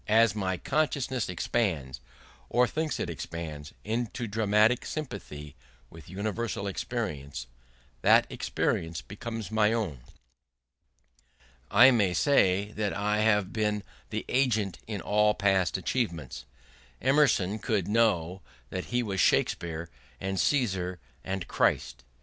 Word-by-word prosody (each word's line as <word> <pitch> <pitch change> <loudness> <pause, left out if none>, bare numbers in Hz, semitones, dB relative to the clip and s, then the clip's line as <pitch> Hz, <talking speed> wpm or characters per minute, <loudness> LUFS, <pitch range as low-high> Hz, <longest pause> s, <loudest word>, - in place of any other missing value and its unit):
As 110 -1 +5
my 95 -3 -1
consciousness 135 - -1
expands, 85 - -1 0.5
or 125 +1 +4
thinks 155 +5 -2
it - - -1
expands, 80 -3 -6
into 115 +2 -2
dramatic 110 +2 +3
sympathy 75 - -6 0.4
with 80 -2 -13
universal 100 +2 -3
experience, 85 - -4 0.6
that - - +6
experience 80 -5 -2
becomes 110 - -6
my 110 -1 +3
own. 105 - -2 1.7
I 120 +6 +8
may 100 -7 +2
say 100 - +3
I 105 0 0
have 105 -3 +2
been 105 -2 0 0.3
the - - -3
agent 110 -8 +1
in 105 -4 -4
all 105 +2 +3
past 95 -3 +2
achievements. 85 - -3 0.5
Emerson 130 -7 +3
could 105 -6 -1
know 100 -5 +1 0.3
that 95 - -3
he 120 0 0
was 100 -4 -3
Shakespeare 85 0 +1 0.3
and 95 0 -2
Caesar 95 - +1 0.2
and 95 -1 -4
Christ. - - 0
105 Hz, 115 wpm, -28 LUFS, 90-115 Hz, 1.7 s, I